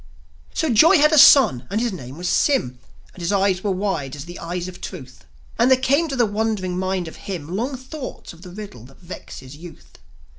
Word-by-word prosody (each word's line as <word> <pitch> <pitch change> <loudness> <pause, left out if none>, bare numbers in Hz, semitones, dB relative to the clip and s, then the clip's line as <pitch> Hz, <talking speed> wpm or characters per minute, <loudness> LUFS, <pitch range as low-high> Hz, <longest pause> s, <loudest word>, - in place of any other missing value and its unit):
So 320 -5 0
Joi 325 - +6
had 300 +1 +4
a 310 - +3
son, 225 - +6
and 210 - -1
his 235 -2 -1
name 130 -5 -9
was 180 +1 -4
Sym; 125 - +1 0.3
And 180 - -12
his 170 - -1
eyes 195 -2 +1
were 205 - -1
wide 185 -8 -2
as 145 0 -8
the 175 +1 -10
eyes 175 +1 -5
of 185 - -10
Truth; 130 -9 -10 0.3
And 240 +2 +4
there 260 - +6
came 280 +5 +1
to 275 - -4
the 245 -2 +3
wondering 205 -3 -2
mind 185 -1 -2
of 160 - -10
him 175 -3 -6
Long 255 +6 -3
thoughts 260 - -9
of 165 - -17
the 180 - -11
riddle 185 - -10
that 135 +1 -18
vexes 145 -6 -10
youth. 170 +2 -14
190 Hz, 215 wpm, -21 LUFS, 170-245 Hz, 0.3 s, Joi